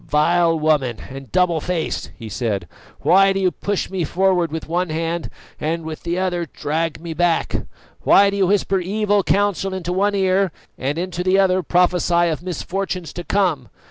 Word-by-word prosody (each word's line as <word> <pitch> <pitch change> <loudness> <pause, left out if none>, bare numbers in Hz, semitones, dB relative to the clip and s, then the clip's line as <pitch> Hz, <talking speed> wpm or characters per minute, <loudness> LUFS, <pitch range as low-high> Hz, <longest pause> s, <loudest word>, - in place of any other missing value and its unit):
"Vile 165 +2 +3
woman, 145 -7 +1
and 135 0 -9
double 180 -3 +2
faced!" 175 -2 -2
he 115 - -8
said, 105 -5 -2 0.3
"why 195 +2 +5
do 195 - -1
you 185 -2 +2
push 200 +1 -2
me 185 -3 -1
forward 180 -1 +1
with 160 0 -5
one 175 +2 -1
hand 165 +1 -2 0.3
and 165 +2 -2
with 160 -1 -6
the 170 +1 -2
other 175 -2 -1
drag 155 +2 -2
me 165 0 -6
back? 170 0 0 0.3
Why 200 0 +5
do 200 - -3
you 195 -2 +3
whisper 195 0 +2
evil 205 +2 +1
counsel 195 -1 0
into 180 -1 -3
one 200 +2 +1
ear 190 -1 +2 0.2
and 140 +4 -2
into 180 0 -3
the 185 +1 +3
other 185 -1 +3
prophesy 175 0 +2
of 155 -1 -3
misfortunes 180 0 -4
to 175 - -6
come? 175 -11 0
175 Hz, 175 wpm, -20 LUFS, 160-190 Hz, 0.3 s, why